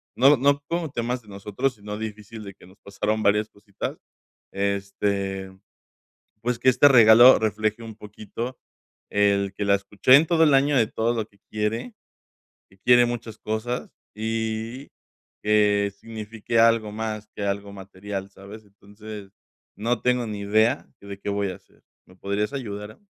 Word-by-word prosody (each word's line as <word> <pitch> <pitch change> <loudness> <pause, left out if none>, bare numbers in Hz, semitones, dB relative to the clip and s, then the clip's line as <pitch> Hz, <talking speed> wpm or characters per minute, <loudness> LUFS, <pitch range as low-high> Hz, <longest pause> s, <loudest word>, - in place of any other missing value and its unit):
no, 135 +2 +6
no 140 +2 +2
como 170 -4 -2
temas 120 0 -3
de 105 - -18
nosotros, 105 +7 -3
sino 105 0 -7
difícil 110 0 -7
de 100 -1 -9
que - - -18
nos 95 - -19
pasaron 105 +2 -2
varias 105 +1 +2
cositas, 100 -1 -7 0.5
este, 100 -1 -2 0.9
pues, 120 0 -2
que 130 - +4
este 135 +3 +6
regalo 120 -1 +8
refleje 110 +1 -1
un 110 -2 -9
poquito 110 +4 -7 0.5
el 100 -1 +1
que 100 - -3
la 100 - +3
escuché 100 +6 +4
en 155 +3 +5
todo 165 -2 +3
el 150 -3 +4
año, 140 +1 +3
de 115 - +4
todo 115 +2 -1
lo 110 - -2
que 100 - -29
quiere, 110 - -2 0.8
que 95 - -23
quiere 120 +2 +5
muchas 120 -2 -5
cosas, 110 +3 -4 0.2
y 110 +3 -3 0.6
que 105 -1 +3
signifique 115 0 -3
algo 115 -2 +4
más 110 -1 -4
que 100 - -5
algo 100 0 -3
material, 95 0 -7
¿sabes?, 100 +3 -12
entonces, 100 0 -12 0.5
no 115 +1 -1
tengo 125 -2 +1
ni 105 -1 -5
idea 110 +6 +2
de 100 -1 -8
qué 100 - -5
voy 100 0 -1
a - - -7
hacer, - - -23 0.2
¿me 90 - -20
podrías 100 +5 -2
ayudar? 105 -5 -6
110 Hz, 160 wpm, -24 LUFS, 100-120 Hz, 0.9 s, regalo